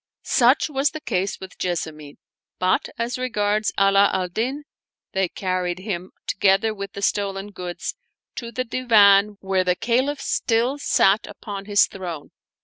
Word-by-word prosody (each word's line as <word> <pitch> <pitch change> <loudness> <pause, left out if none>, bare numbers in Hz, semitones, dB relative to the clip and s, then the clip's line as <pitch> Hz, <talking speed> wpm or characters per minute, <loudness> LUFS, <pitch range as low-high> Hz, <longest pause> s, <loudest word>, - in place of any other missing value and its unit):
Such 255 0 +3
was 285 -1 +1
the 310 - -7
case 195 -8 -2
with 190 0 -11
Jessamine; 155 -4 -4 0.4
but 185 0 +1
as 235 +2 -2
regards 215 -3 0
Ala 195 0 +5
al 180 -1 -1
Din, 255 +10 -2 0.5
they 190 -2 0
carried 185 -1 -2
him, 185 -2 -5
together 195 +3 +2
with 200 -2 -7
the 200 - -6
stolen 200 0 -1
goods, 180 -2 -5 0.4
to 235 -1 -5
the 255 +3 -2
Divan 210 -5 +4
where 190 -1 +1
the 180 -1 +1
Caliph 260 +7 0
still 245 +1 0
sat 205 -6 +3
upon 200 -2 -7
hik 205 0 +3
throne. 175 -6 -7
200 Hz, 145 wpm, -23 LUFS, 185-235 Hz, 0.5 s, Ala